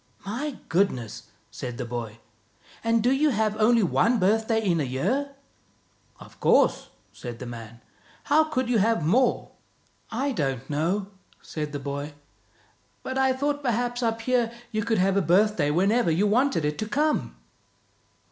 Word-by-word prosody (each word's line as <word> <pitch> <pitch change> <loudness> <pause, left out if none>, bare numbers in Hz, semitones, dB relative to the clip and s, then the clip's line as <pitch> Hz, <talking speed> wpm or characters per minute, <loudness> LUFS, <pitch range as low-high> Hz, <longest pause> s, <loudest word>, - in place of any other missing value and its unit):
" - - -25
My 255 +8 -4
goodness! 160 - -1
" - - -38
said 125 -1 -6
the 125 - -4
boy. 115 -2 -5 0.7
"And 230 -1 +2
do 245 - +3
you 295 +3 +3
have 215 -4 0
only 225 +1 +4
one 230 +6 +2
birthday 220 +3 +2
in 185 -6 +1
a - - +1
year?" 230 - -1 0.4
" - - -37
Of - - -15
course," - - +3 0.2
said 120 -2 -8
the 125 - -7
man. 115 -1 -9 0.2
" - - -29
How 310 +2 +4
could 260 -5 -1
you 240 -3 +2
have 210 -6 +2
more? 250 +11 +2 0.2
" - - -39
" - - -39 0.2
I 285 - 0
don't 135 - -2
know," 185 +7 -1 0.3
said 150 -2 -5
the 145 - -3
boy, 140 +1 -5 0.5
" - - -37
but 260 0 -3
I 265 0 +3
thought 285 +2 -1
perhaps 245 -1 -1
up 225 -1 -1
here 240 -1 +1 0.2
you 215 -1 -1
could 225 0 0
have 195 +1 +2
a - - +4
birthday 180 -2 +3
whenever 195 +6 +2
you 170 +6 +2
wanted 230 - +2
it 150 0 -2
to 215 - -2
come." 300 +5 0
210 Hz, 180 wpm, -26 LUFS, 150-245 Hz, 0.7 s, only